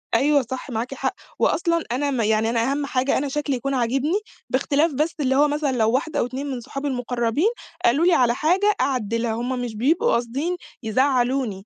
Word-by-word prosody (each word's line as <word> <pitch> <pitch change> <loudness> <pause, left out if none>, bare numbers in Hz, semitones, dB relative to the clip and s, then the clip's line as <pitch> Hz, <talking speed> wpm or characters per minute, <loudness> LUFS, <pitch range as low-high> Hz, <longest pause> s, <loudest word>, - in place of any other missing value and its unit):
أيوه 290 0 +4
صح 260 +3 -6
معاكِ 240 +2 -3
حق، - - -2 0.3
وأصلًا 335 -1 +1
أنا 280 +3 0
م 255 -4 0
يعني 220 +1 +2
أنا 235 +3 +1
أهم 285 0 -1
حاجة 260 0 +1
أنا 285 - -1
شكلي 285 0 -1
يكون 275 +3 -2
عاجبني، 270 - +1 0.3
باختلاف 285 +4 +1
بس 305 +5 0
اللي 265 -2 +1
هو 290 +2 +5
مثلًا 295 -1 0
لو 225 -3 +2
واحدة 295 +6 0
أو - - +2
2 260 +3 -5
من 260 -3 -3
صُحابي 275 +5 -5
المُقرّبين 245 - 0 0.4
قالوا 280 +8 +4
لي 360 - +5
على 245 -5 +4
حاجة 380 +8 +2
أعدِّلها، 230 -3 0
هُم 245 +3 -2
مش 240 -3 -4
بيبقوا 320 - +2
قاصدين 270 +9 -1 0.3
يزعّلُوني، 245 -3 +1
265 Hz, 190 wpm, -23 LUFS, 240-290 Hz, 0.4 s, هو